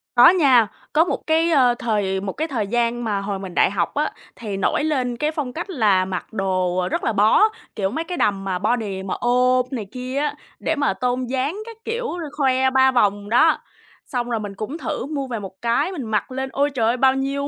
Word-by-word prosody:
Có 245 - +9
nha, 270 - +5 0.3
có 315 +2 +5
một - - -4
cái, 325 +1 +3
ơ, 255 -5 +4
thời 200 -4 0
một 195 -2 -4
cái 315 +3 -2
thời 230 -9 -2
gian 240 +1 0
mà 205 -3 -1
hồi 200 -1 -3
mình 190 -2 -7
đại - - +4
học 190 -4 -1
á, 295 +1 0 0.2
thì 210 -4 -5
nổi 195 - +1
lên 255 -6 -1
cái 300 +3 0
phong 285 -5 -4
cách 345 +4 -5
là 205 - +2
mặc 185 +3 -5
đồ 185 -2 0
rất - - -1
là 225 - 0
bó, 210 - +4 0.3
kiểu, 195 -3 0
mấy 320 +6 -2
cái 355 +1 -5
đầm 195 -2 +1
mà 185 -2 -2
body 210 -3 -1
mà 190 - -3
ôm 250 +1 +3
này 230 -6 -3
kia 255 +1 -5
á, 295 +1 0 0.2
để - - -1
mà 285 -8 +1
tôn 250 +5 -1
dáng 265 +7 -2
các 460 -1 -10
kiểu, 460 -4 -3
l 340 - -4
khoe 265 -2 +3
3 265 0 +4
vòng 205 -4 +1
đó. 310 +8 +4 0.5
Xong 245 -3 -3
rồi 230 -2 -1
mình 205 -2 -6
cũng 240 +11 -5
thử 310 -4 -4
mua 280 -2 -3
về 235 -3 -4
một 190 -2 -10
cái 235 +10 +1
mình 325 -8 -5
mặc 220 +3 -1
lên, 265 +1 -3
ôi 285 +1 +1
trời 240 -6 0
ơi, 240 - +1
bao 260 +1 +4
nhiêu 275 +1 -2
245 Hz, 235 wpm, -22 LUFS, 205-280 Hz, 0.5 s, Có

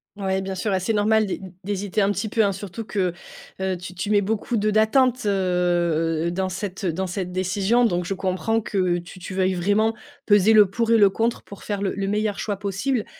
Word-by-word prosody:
Ouais, 190 -1 -1
bien 190 0 -4
sûr 195 +2 -1
et 190 - +2
c'est 190 +5 -1
normal 215 +1 +3
d'hé 190 - -3 0.2
d'hésiter 205 +1 -2
un 195 - +3
petit 210 +3 -2
peu, 220 +1 +2
hein, 200 - +2
surtout 195 +3 -6
que, 190 -4 -1 0.5
heu, 190 -1 -1
tu 180 +1 -9
tu 185 +3 -4
mets 205 -1 +4
beaucoup 220 +3 -1
de 210 0 +1
d'attente, 230 +2 +3
heu, 175 -4 +1
dans 190 +1 -1
cette, 190 +1 -5
heu, 175 - +1
dans 190 +2 -2
cette 180 0 -4
décision. 195 +6 +1
Donc, 180 -5 0
je 195 - -2
comprends 190 +4 0
que 185 -5 0
tu 175 +2 -10
tu 185 +1 -7
veuilles 190 0 +2
vraiment 205 +5 +1 0.3
peser 205 +1 +5
le 210 -1 +8
pour 230 +2 -1
et 230 - +6
le 200 -3 +5
contre 230 +3 -1
pour 200 - -12
faire 205 -1 -3
le 195 - -1
le 195 0 -3
meilleur 210 0 -1
choix 205 -2 -2
possible. 205 +5 -2
195 Hz, 225 wpm, -23 LUFS, 185-215 Hz, 0.5 s, le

